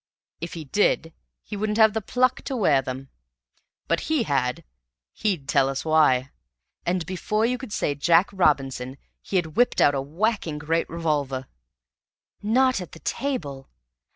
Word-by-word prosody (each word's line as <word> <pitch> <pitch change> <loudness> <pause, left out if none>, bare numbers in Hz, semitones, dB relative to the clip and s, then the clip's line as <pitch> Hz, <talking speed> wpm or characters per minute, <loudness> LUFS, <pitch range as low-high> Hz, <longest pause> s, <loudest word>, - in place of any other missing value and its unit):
If 170 +2 -6
he 160 -2 -6
did, 165 0 +1 0.3
he - - -7
wouldn't 210 +1 -1
have 220 -2 +6
the 220 - -1
pluck 255 +4 +1
to 270 - -3
wear 150 - +3
them. 130 0 -6 0.8
But - - +1
he 310 -6 +2
had 125 - -1 0.5
he'd 185 -11 -2
tell 135 -1 +3
us 135 +2 -4
why. 140 -5 +3 0.6
And 175 -1 0
before 210 +5 -1
you 250 +1 0
could 255 -4 -8
say 145 - 0
Jack 165 +6 +4
Robinson 135 -7 +1 0.2
he - - -6
had 160 -4 0
whipped 245 - +3
out 145 - +5
a 135 - -1
whacking 165 +2 -1
great 160 +3 -1
revolver!" 145 -6 -1 1.0
"Not 250 +1 +2
at 180 - -9
the 160 - -11
table?" 155 - -3
165 Hz, 155 wpm, -24 LUFS, 140-215 Hz, 1.0 s, have